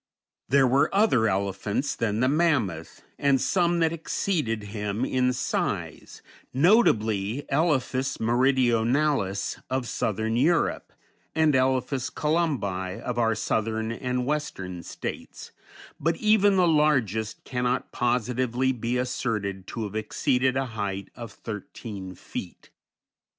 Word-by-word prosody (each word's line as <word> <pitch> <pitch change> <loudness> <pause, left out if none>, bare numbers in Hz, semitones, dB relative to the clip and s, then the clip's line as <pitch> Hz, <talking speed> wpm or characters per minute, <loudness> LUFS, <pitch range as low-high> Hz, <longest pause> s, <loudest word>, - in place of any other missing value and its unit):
There 135 +1 +5
were 135 +3 +3
other 165 - +4
elephants 100 +6 -1
than 110 -1 -1
the 130 - +3
mammoth, 130 - 0 0.2
and 140 -2 +3
some 175 +1 +2
that 165 0 +2
exceeded 155 - -1
him 105 +2 -2
in 125 -1 +1
size, 125 - -3 0.3
notably 120 - +3
Elephas 135 -3 +1
meridionalis 120 -2 +1
of 130 -1 -1
southern 110 +1 -1
Europe, 165 +7 +1 0.4
and 160 -2 +4
Elephas 130 0 +1
columbi 130 - -1
of 120 -1 -3
our 115 -1 +2
Southern 110 +1 -1
and 125 +1 -2
Western 95 -12 -3
States, - - -7 0.5
but 165 +2 0
even 210 -2 +4
the 180 -2 +4
largest 130 - +1
cannot 125 0 -1
positively 125 +1 0
be 120 0 -2
asserted 105 -6 -2
to 115 - -4
have 105 -2 -5
exceeded 125 +4 +1
a 135 - 0
height 100 -2 -4
of 120 -2 -8
thirteen 100 -2 -7
feet. - - -8
125 Hz, 115 wpm, -26 LUFS, 110-140 Hz, 0.5 s, There